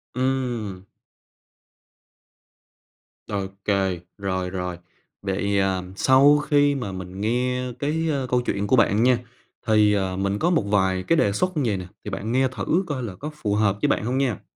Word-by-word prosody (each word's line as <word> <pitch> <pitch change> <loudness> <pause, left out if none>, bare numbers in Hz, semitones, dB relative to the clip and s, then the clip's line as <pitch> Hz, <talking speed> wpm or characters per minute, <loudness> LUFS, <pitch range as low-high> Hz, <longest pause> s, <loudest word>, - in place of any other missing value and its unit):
Ừm. 125 -7 -2 2.4
Ô 100 -2 -2 0.2
kê, 95 -3 +1 0.2
rồi, 95 -2 -2
rồi. 90 -1 -4 0.4
Vậy, 100 +1 0
ờ, 95 -1 0
sau 135 +6 +5
khi 145 -1 +2
mà 115 -8 -4
mình 95 +1 -7
nghe 125 +3 0
cái, 160 +3 -1
ơ, 140 -4 -1
câu 125 0 +2
chuyện 100 -4 -2
của 130 - +4
bạn 110 -2 +3
nha, 125 -1 +4 0.5
thì, 105 -1 +4
ờ, 95 -2 0
mình 100 +1 -1
có 175 - +2
một 170 - +3
vài 95 -2 +1
cái 165 - +3
đề 100 - +3
xuất 185 - 0
vầy 120 -9 0
nè, 90 -1 -7 0.2
thì - - -5
bạn 105 +4 -4
nghe 130 +1 +3
thử 130 - 0
coi 140 -4 -3
là 105 -6 -5
có 150 +10 -6
phù 105 -8 -1
hợp 100 -2 +2
với - - +3
bạn 105 - 0
hông 125 +2 -1
nha? 130 -8 0
105 Hz, 175 wpm, -24 LUFS, 95-130 Hz, 2.4 s, sau